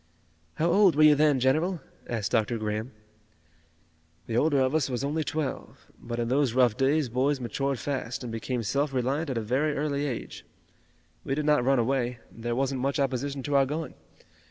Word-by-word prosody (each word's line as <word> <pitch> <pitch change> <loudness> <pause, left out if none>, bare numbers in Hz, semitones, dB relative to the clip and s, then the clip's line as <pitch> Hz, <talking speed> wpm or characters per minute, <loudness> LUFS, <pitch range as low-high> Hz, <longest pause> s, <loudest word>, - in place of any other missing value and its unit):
"How 160 - 0
old 195 -4 +5
were 155 - +5
you 155 - +8
two - - +5
then, 150 -2 +3
General?" 155 +8 +1 0.3
asked 110 -4 -2
Dr. 115 +1 +1
Graham. 110 +3 -3 1.3
"The 115 - -4
older 145 +3 +3
of 130 +1 +2
us 155 -4 +1
was 125 +1 -2
only 150 +3 -1
twelve. 145 -1 -4
But 120 0 -6
in 120 -1 -1
those 130 -1 +1
rough 125 -4 +4
days 140 +2 +2
boys 130 +4 0
matured 135 +3 -2
fast 130 -2 -4
and 120 - -5
became 115 +2 -3
self 140 +6 -1
reliant 135 +5 0
at 130 - -2
a - - 0
very 135 +7 0
early 145 0 -1
age. 125 -5 -6 0.8
We 135 - -2
did 150 0 -2
not 150 -4 +3
run 135 +2 +3
away. 125 0 0
There 120 +1 -4
wasn't 135 0 -1
much 140 +2 0
opposition 135 0 -1
to 145 +1 -1
our 135 -1 +4
going. 155 +3 -4
135 Hz, 190 wpm, -27 LUFS, 120-145 Hz, 1.3 s, you